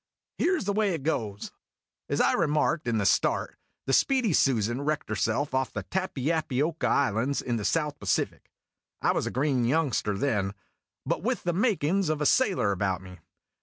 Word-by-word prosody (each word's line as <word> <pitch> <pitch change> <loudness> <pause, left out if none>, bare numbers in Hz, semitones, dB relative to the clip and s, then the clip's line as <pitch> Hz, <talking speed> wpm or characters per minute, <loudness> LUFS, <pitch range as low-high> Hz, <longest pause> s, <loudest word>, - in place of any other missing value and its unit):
"Here 365 0 +2
's - - -5
the 200 - 0
way 205 -3 +1
it 150 - -7
goes:" 110 -10 -2 0.6
As - - 0
I - - +4
remarked 150 -1 +1
in 115 -2 +1
the 105 - 0
start, - - +1 0.3
the 135 - -1
Speedy 255 - +3
Susan 120 -2 +2
wrecked 150 -2 -2
herself 110 +7 -1
off 130 0 0
the - - -4
Tappy 170 -6 -2
appy 155 -6 -1
oca 160 +2 0
Islands 135 +1 +1
in 120 -2 -2
the 105 - -4
South 150 +3 0
Pacific. 100 - -2 0.5
I - - +4
was - - -1
a - - 0
green 130 -1 0
youngster 125 -6 +1
then, 105 -5 -1 0.5
but - - -1
with - - -1
the 175 - 0
makin's 195 - +1
of 155 -1 0
a 150 - 0
sailor 190 - +3
about 95 -1 -1
me. 90 -1 -12
140 Hz, 185 wpm, -27 LUFS, 110-165 Hz, 0.6 s, I